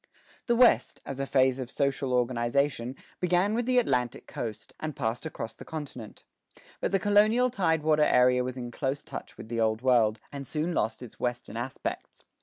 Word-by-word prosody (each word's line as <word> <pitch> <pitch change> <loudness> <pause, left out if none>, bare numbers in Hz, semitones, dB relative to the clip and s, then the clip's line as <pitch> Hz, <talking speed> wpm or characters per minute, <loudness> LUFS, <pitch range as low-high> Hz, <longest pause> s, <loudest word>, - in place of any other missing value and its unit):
The 240 - +3
West, 245 0 +4
as 135 -1 -5
a 135 - -1
phase 130 -1 +3
of 125 -2 -4
social 135 -1 0
organization, 125 +1 0 0.2
began 180 +3 +2
with 240 +1 -1
the 255 0 +3
Atlantic 125 - +1
coast, 110 -3 -6
and 155 -1 -4
passed 120 +4 -2
across 115 -7 -6
the - - -11
continent. 140 -8 -8 0.6
But - - -1
the 195 - +4
colonial 215 +5 +4
tide 160 -7 +1
water 155 -1 +3
area 125 -1 +4
was 130 +1 -4
in 120 -1 -5
close 135 +3 -2
touch - - -8
with - - -9
the 115 0 -2
Old 110 +1 +1
World, 115 -4 +3
and 140 -2 -7
soon 160 +3 -1
lost 110 -3 -1
its 120 - -12
Western 120 -2 -3
aspects. 120 +3 -5
130 Hz, 185 wpm, -28 LUFS, 120-160 Hz, 0.6 s, West